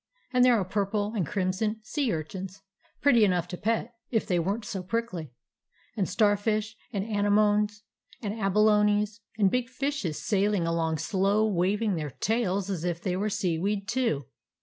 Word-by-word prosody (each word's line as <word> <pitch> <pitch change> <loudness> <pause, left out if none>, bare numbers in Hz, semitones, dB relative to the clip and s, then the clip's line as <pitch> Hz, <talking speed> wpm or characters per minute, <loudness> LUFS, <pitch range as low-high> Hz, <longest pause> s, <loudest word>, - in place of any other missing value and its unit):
And 250 0 +5
there 245 -3 +5
are 190 - -1
purple 205 +2 -1
and 185 -8 0
crim 185 -2 0
son 215 +3 -1
sea 275 0 -1
urchins, 185 +4 -5 0.4
pretty 245 -6 +5
enough 180 -4 +2
to 180 - -4
pet, 225 +4 -1 0.2
if 225 -3 0
they 180 -2 +1
were 195 +5 0
n't 230 - -10
so 190 - -4
prickly; 185 - -3 0.6
and 200 -5 -1
starfish 215 0 +1 0.2
and 200 -4 -1
anemones 210 0 +2 0.4
and 205 -2 -3
abalones, 210 0 +2 0.2
and 200 -3 +3
big 250 -1 0
fishes 260 - -2
sailing 200 -3 +1
along 165 -1 0
slow, 200 +6 +1
waving 200 +1 +1
their 150 -2 -3
tails 200 - -1
as 185 -5 -3
if 175 -2 -1
they 180 0 -2
were 205 +3 0
seaweed, 195 +2 -1
too. 230 - 0
205 Hz, 165 wpm, -28 LUFS, 185-220 Hz, 0.6 s, And